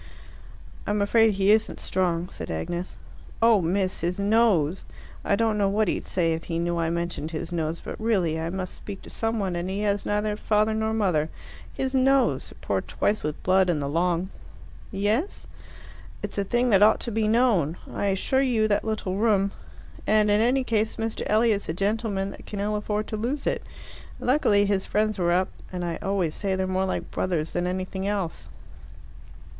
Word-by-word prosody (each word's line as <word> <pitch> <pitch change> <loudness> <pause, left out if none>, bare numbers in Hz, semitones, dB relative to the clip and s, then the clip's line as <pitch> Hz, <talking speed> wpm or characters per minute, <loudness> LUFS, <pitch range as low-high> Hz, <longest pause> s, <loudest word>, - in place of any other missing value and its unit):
"I'm 210 0 +1
afraid 220 +1 +4
he 195 +1 +3
isn't 220 0 +2
strong," 180 -2 0
said - - -8
Agnes. 170 - -4 0.4
"Oh, 225 -3 +5
miss, 185 +2 0
his 175 +2 -1
nose! 200 -6 +2 0.4
I 200 - +2
don't 220 0 +1
know 200 -1 +3
what 210 +1 +1
he'd - - -1
say 165 -3 +1
if 160 +1 -5
he 165 - -3
knew 170 0 -1
I 165 -1 +1
mentioned 170 -2 -3
his 165 +1 -5
nose, 165 -1 -2
but - - -6
really 185 -8 +1
I 165 +1 -2
must 185 0 -4
speak 200 -2 -9
to - - -11
someone, 220 -5 -1
and 175 +2 -3
he 195 +2 -2
has 205 -1 0
neither 210 0 0
father 215 +1 +1
nor 220 0 0
mother. 180 -8 +1 0.4
His 265 0 -3
nose! 270 0 +2
It - - -16
poured - - -2
twice 215 - 0
with 150 0 -4
blood 185 0 +3
in 165 -4 +1
the 140 - -2
Long." 175 +4 0 0.6
"Yes?" 215 - -1 0.8
"It's - - -3
a - - +2
thing 240 +4 +1
that 195 -1 +5
ought 215 +1 +6
to 235 - -3
be 220 0 +1
known. 215 - +2 0.2
I - - -2
assure 200 +7 +1
you, 235 -5 +2
that 205 - +2
little 215 -4 -2
room!... 200 -3 +2 0.6
And 215 -1 +4
in 205 +1 +4
any 255 +3 +3
case, 220 -2 0
Mr. 225 0 -3
Elliot's 215 -3 +2
a - - 0
gentleman 200 +1 -1
that - - -12
can 205 - -5
ill 210 +1 0
afford 210 0 -2
to 215 - -3
lose 255 +7 -2
it. - - 0 0.6
Luckily 220 -6 +3
his 200 -1 0
friends 215 -1 0
were 175 -1 +2
up; 185 +1 +2 0.2
and 180 -1 -3
I 170 -1 -2
always 190 -5 0
say 195 -2 -1
they're 190 0 0
more 185 0 0
like 190 - -3
brothers 165 -4 -1
than 175 0 0
anything 185 +1 -3
else." 200 -5 -3
200 Hz, 190 wpm, -25 LUFS, 180-215 Hz, 0.8 s, ought